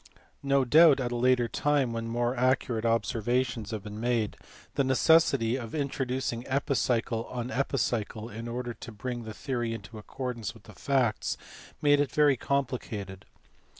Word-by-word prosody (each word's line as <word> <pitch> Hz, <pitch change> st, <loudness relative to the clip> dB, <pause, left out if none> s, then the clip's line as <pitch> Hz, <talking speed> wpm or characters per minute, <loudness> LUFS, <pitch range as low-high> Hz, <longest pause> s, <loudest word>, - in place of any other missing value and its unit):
No 140 Hz, -1 st, +2 dB
doubt 155 Hz, +2 st, +7 dB
at 125 Hz, -2 st, -2 dB
a -, -, -2 dB
later 125 Hz, 0 st, +3 dB
time, 140 Hz, -1 st, +1 dB
when 115 Hz, 0 st, -3 dB
more 120 Hz, +2 st, 0 dB
accu 130 Hz, +1 st, +2 dB
rate 115 Hz, 0 st, -1 dB
observations 115 Hz, 0 st, 0 dB
had 110 Hz, -3 st, -4 dB
been 105 Hz, 0 st, -7 dB
made, 115 Hz, -2 st, 0 dB, 0.4 s
the 140 Hz, -, +1 dB
necessity 130 Hz, -3 st, +4 dB
of 115 Hz, -1 st, -6 dB
introducing 130 Hz, -4 st, -2 dB
epicycle 125 Hz, -4 st, 0 dB
on 125 Hz, 0 st, -5 dB
epicycle 115 Hz, -5 st, -1 dB
in 115 Hz, +1 st, -7 dB
order 120 Hz, 0 st, -4 dB
to 115 Hz, -, -10 dB
bring 120 Hz, +2 st, -5 dB
the 110 Hz, -, -6 dB
theory 120 Hz, -3 st, -2 dB
into 110 Hz, +1 st, -9 dB
accord 125 Hz, +3 st, -5 dB
ance 110 Hz, -3 st, -5 dB
with -, -, -16 dB
the -, -, -13 dB
facts 130 Hz, -6 st, 0 dB, 0.5 s
made 145 Hz, -1 st, +5 dB
it 145 Hz, -2 st, +1 dB
very 150 Hz, -2 st, +4 dB
complicated. 115 Hz, -8 st, -3 dB
120 Hz, 160 wpm, -29 LUFS, 115-135 Hz, 0.5 s, doubt